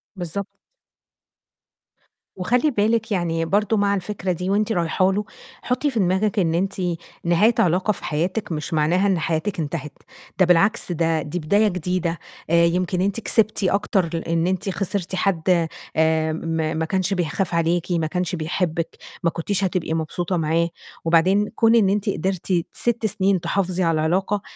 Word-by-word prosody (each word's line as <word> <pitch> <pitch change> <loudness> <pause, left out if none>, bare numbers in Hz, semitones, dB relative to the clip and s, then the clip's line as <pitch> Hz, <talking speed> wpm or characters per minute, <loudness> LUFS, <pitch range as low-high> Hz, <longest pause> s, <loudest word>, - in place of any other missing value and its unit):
بالضبط. 190 +2 -5 1.8
وخلّي 245 +10 +2
بالِك، 220 +1 +1
يعني 165 -4 0
برضه 210 +5 +1
مع 200 0 +2
الفكرة 190 -1 -3
دي 180 +2 -3
وأنتِ 210 +2 +1
رايحه 180 +1 +1
له، 205 +2 -1 0.4
حطّي 255 +4 0
في 230 - -1
دماغِك 190 +3 +1
إن 165 -3 +1
أنتِ 190 +3 0 0.5
نهاية 175 +7 +4
علاقة 185 +4 +2
في 205 - -6
حياتِك 180 +7 -2
مش 155 0 -4
معناها 165 +6 +2
إن 190 -3 +2
حياتِك 165 +4 -2
انتهت، 150 -1 -4 0.5
ده 185 - +6
بالعكس 185 +4 +3
ده 165 -1 +1
دي 155 +4 -4
بداية 205 +7 +3
جديدة. 180 -2 -2 0.3
آآ، 170 0 +5
يمكن 180 +1 0
أنتِ 200 +3 0
كسبتِ 215 -2 +1
أكتر 190 -2 +1
لإن 165 0 0
أنتِ 190 +2 -1
خسرتِ 190 -1 -2
حد 180 -3 +1 0.3
آآ، 160 0 +2
م - - -2
ما 160 -1 -1
ما 160 0 -1
كانش 190 +3 0
بيخاف 180 +1 -1
عليكِ، 170 +1 0
ما 165 -2 +1
كانش 180 +2 -2
بيحبِك، 165 0 -2 0.3
ما 170 - +3
كنتيش 185 +4 -2
هتبقي 180 -3 -1
مبسوطة 175 +3 -2
معاه، 165 +1 +1 0.4
وبعدين 185 +5 +3
كون 225 0 +4
إن 210 -5 +4
أنتِ 205 +1 0
قدرتِ 185 -1 -1
6 235 -1 0
سِنين 195 -3 +1
تحافظي 185 +1 0
على 165 -1 +2
العلاقة، 190 +6 0
180 Hz, 160 wpm, -22 LUFS, 165-200 Hz, 1.8 s, ده